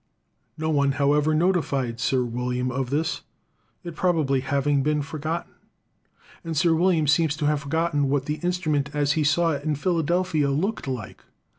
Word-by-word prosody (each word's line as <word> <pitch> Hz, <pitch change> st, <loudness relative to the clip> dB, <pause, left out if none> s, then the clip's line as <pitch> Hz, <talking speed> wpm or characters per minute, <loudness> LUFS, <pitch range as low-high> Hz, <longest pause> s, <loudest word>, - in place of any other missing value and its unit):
No 160 Hz, 0 st, -1 dB
one, 140 Hz, -2 st, +2 dB
however, 145 Hz, +3 st, +2 dB
notified 150 Hz, -9 st, 0 dB
Sir 130 Hz, +1 st, +1 dB
William 125 Hz, +1 st, -2 dB
of 130 Hz, -1 st, -2 dB
this, 155 Hz, +4 st, -1 dB, 0.6 s
it 170 Hz, -2 st, -7 dB
probably 155 Hz, -7 st, +1 dB
having 140 Hz, +2 st, +1 dB
been 150 Hz, +1 st, 0 dB
forgotten; 155 Hz, +3 st, -4 dB, 0.9 s
and 165 Hz, -2 st, -4 dB
Sir 165 Hz, +2 st, +3 dB
William 165 Hz, -1 st, +2 dB
seems 150 Hz, +1 st, +2 dB
to 155 Hz, -, -2 dB
have 150 Hz, 0 st, +2 dB
forgotten 145 Hz, -1 st, 0 dB
what 140 Hz, -1 st, 0 dB
the 150 Hz, +1 st, -2 dB
instrument, 160 Hz, -6 st, 0 dB
as 145 Hz, -1 st, +1 dB
he 155 Hz, 0 st, +1 dB
saw 165 Hz, +3 st, +2 dB
it 140 Hz, -2 st, -3 dB
in 155 Hz, -1 st, 0 dB
Philadelphia, 170 Hz, -1 st, 0 dB
looked 170 Hz, +7 st, -1 dB
like. 125 Hz, -7 st, -6 dB
150 Hz, 160 wpm, -24 LUFS, 140-165 Hz, 0.9 s, Sir